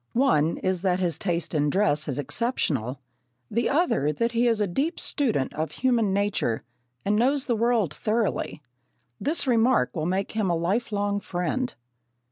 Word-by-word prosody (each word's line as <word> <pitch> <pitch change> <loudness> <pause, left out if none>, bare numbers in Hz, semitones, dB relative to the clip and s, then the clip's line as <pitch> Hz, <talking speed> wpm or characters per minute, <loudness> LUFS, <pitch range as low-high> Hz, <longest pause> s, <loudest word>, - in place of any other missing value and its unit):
One 170 - +3
is 185 -2 -1
that 185 -2 +2
his 175 -3 0
taste 175 -4 -2
in 150 -1 +2
dress 155 -4 +1
is 140 - -2
exceptional; 140 - -1 0.5
the 235 +2 +1
other 280 - +2
that 230 +10 -1
he 235 +1 +2
is 230 -2 +2
a 210 - +2
deep 275 - -1
student 225 - 0
of 155 +1 -3
human 240 -5 +1
nature 200 - 0 0.5
and 205 +1 +2
knows 265 +5 +2
the 240 - +1
world 225 -7 +1
thoroughly. 215 -8 -1 0.6
This 300 +2 0
remark 235 - +3
will 155 0 -1
make 190 +2 -1
him 215 -3 0
your 170 -2 +1
lifelong 205 +3 0
friend. 200 +8 -2
205 Hz, 160 wpm, -26 LUFS, 165-235 Hz, 0.6 s, One